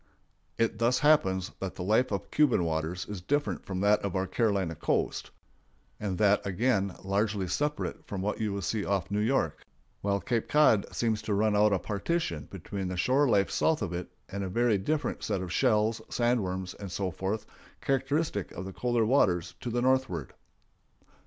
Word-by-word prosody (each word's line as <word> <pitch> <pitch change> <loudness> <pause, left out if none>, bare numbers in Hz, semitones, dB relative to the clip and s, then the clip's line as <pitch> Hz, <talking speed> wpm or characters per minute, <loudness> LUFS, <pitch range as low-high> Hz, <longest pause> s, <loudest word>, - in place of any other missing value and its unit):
It 115 -1 0
thus 120 +2 +3
happens 95 - +3
that 95 -1 -4
the 90 - -5
life 110 +6 +2
of 100 - -3
Cuban 145 -11 +3
waters 80 +2 -2
is 105 -3 -6
different 145 +10 -1
from 95 -1 -3
that 105 +1 +4
of 100 -2 -3
our 95 0 +1
Carolina 95 -3 0
coast; - - -1 0.7
and 100 -3 -2
that, 105 -1 +3
again, 100 -1 0
largely 100 0 0
separate 150 +11 -2
from 100 - -4
what 105 +2 -2
you 110 -2 0
will 100 -1 -3
see 105 +5 -1
off 100 -1 -1
New 105 - +1
York; 110 - 0 0.4
while 100 0 +1
Cape 115 +2 -1
Cod 150 -9 +4
seems 110 -2 0
to 105 -2 -1
run 105 +1 +2
out 105 +1 +4
as - - +4
a - - -1
partition 100 - -2
between 95 +1 -5
the 90 0 -4
shore 130 +9 +3
life 100 -3 +3
south 160 -8 +1
of 90 -4 -3
it 90 +1 -4 0.2
and 100 0 -4
a 95 - -3
very 115 +1 +2
different 150 +10 -1
set 100 -3 -1
of 90 -1 -4
shells, 110 -3 +2
sand 120 0 +2
worms, 95 -1 -3
and 100 -3 -8
so 95 +1 -2
forth, 95 +5 -3 0.3
characteristic 135 - 0
of 95 - -6
the 95 - -7
colder 120 0 +1
waters 90 -8 +2
to 125 - -4
the 120 +1 0
northward. 130 - +1
105 Hz, 190 wpm, -29 LUFS, 95-120 Hz, 0.7 s, that